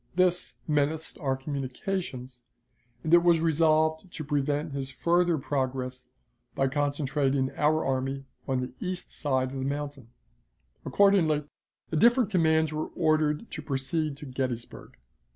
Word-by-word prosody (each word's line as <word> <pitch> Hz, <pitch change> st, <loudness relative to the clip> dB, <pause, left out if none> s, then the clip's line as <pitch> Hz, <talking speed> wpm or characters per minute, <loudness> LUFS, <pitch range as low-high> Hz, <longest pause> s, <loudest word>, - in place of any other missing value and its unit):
This 180 Hz, -1 st, +2 dB
menaced 150 Hz, +1 st, 0 dB
our 135 Hz, -3 st, 0 dB
communications, 135 Hz, -1 st, -4 dB, 0.6 s
and 160 Hz, -, 0 dB
it 175 Hz, -, +8 dB
was 170 Hz, -1 st, +4 dB
resolved 160 Hz, +1 st, +2 dB
to 165 Hz, -, -6 dB
prevent 145 Hz, +1 st, -1 dB
his 135 Hz, -1 st, -3 dB
further 170 Hz, +4 st, +2 dB
progress 130 Hz, -2 st, -3 dB, 0.5 s
by 135 Hz, -1 st, +2 dB
concentrating 140 Hz, -1 st, 0 dB
our 155 Hz, +1 st, +1 dB
army 135 Hz, +1 st, -1 dB, 0.2 s
on 130 Hz, -2 st, 0 dB
the 125 Hz, -, -5 dB
east 185 Hz, 0 st, -4 dB
side 130 Hz, -3 st, 0 dB
of 135 Hz, -, -5 dB
the -, -, -2 dB
mountain. 140 Hz, -2 st, -4 dB, 0.8 s
Accordingly, 180 Hz, -7 st, +4 dB, 0.5 s
the 160 Hz, -, 0 dB
different 235 Hz, +3 st, +4 dB
commands 160 Hz, -4 st, +3 dB
were 155 Hz, 0 st, -2 dB
ordered 155 Hz, +2 st, +1 dB
to 155 Hz, -, -5 dB
proceed 145 Hz, +1 st, -2 dB
to 150 Hz, -, -9 dB
Gettysburg. 130 Hz, -3 st, -5 dB
150 Hz, 135 wpm, -28 LUFS, 135-160 Hz, 0.8 s, it